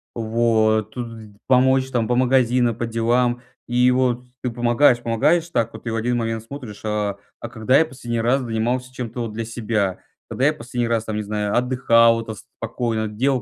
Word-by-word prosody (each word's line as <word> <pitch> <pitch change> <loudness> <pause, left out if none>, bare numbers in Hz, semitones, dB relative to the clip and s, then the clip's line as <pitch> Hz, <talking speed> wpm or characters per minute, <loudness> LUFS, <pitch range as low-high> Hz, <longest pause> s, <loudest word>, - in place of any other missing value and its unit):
Вот. 110 -1 +1
Тыды 115 -4 -8
помочь 130 +1 +3
там 115 -3 0
по 120 - +1
магазинам, 125 -2 +2
по 120 - -3
делам. 120 +2 +1 0.3
И 125 +1 +3
вот 125 -1 +1 0.2
ты 125 - -1
помогаешь, 120 +1 +3
помогаешь 155 +10 +1
так 115 -7 -1
вот 110 - -11
и - - 0
в 115 - -2
один 120 +2 0
момент 115 -1 -2
смотришь: 120 -4 -9
"А, 105 -2 -1 0.2
а 120 - -6
когда 120 +3 +2
я 160 - +4
последний 120 -6 -4
раз 130 +4 +2
занимался 125 +2 -2
чем-то 120 -1 -5
вот 115 -2 -4
для 115 +1 -3
себя? 110 -4 -2 0.3
Когда 130 - 0
я 150 - +4
последний 120 -2 -3
раз 115 -1 0
там, 110 - -4
не 105 - -1
знаю, 105 0 -2
отдыхал, 115 -2 +4
это, 110 -1 -6
спокойно, 110 +1 -4
делал 125 +5 0
120 Hz, 190 wpm, -21 LUFS, 110-125 Hz, 0.3 s, я